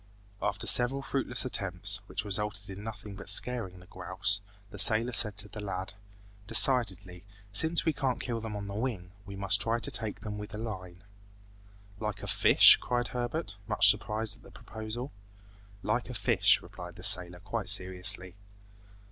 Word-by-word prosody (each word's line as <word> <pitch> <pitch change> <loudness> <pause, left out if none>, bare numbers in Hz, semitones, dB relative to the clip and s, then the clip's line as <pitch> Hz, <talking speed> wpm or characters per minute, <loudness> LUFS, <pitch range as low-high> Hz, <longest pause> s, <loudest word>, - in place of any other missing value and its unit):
After 100 +1 -2
several 130 +3 +1
fruitless 135 -3 -3
attempts, 100 -3 +1
which - - -5
resulted 105 0 0
in 100 +2 -10
nothing 105 -2 -9
but 95 - -4
scaring 115 -8 +2
the 90 - -17
grouse, 95 +2 -1 0.3
the 105 - -8
sailor 115 +5 +5
said 105 -3 +3
to 105 0 0
the 105 +1 -10
lad, 95 -1 -6 0.5
"Decidedly, 100 -9 +3 0.3
since 160 +9 +1
we 160 - 0
can't 135 -3 -3
kill 115 -3 -5
them 110 -1 -7
on 100 -1 -7
the 100 - -8
wing, 105 -5 -5 0.2
we 100 - -9
must 100 +1 +1
try 115 +1 0
to - - -1
take 110 -2 -5
them 105 -1 -7
with 105 +1 -9
a - - -7
line." 95 -5 -9 1.0
"Like 105 -2 -6
a - - -7
fish?" - - +6
cried 120 -1 -3
Herbert, 125 -2 -5
much 100 - +3
surprised 105 +1 -5
at - - -24
the - - -17
proposal. 110 +4 -9 0.7
"Like - - -3
a - - -8
fish," - - +1
replied - - -12
the - - -14
sailor 90 -1 +4
quite 100 +3 -3
seriously. 95 0 +4
105 Hz, 170 wpm, -28 LUFS, 95-115 Hz, 1.0 s, fish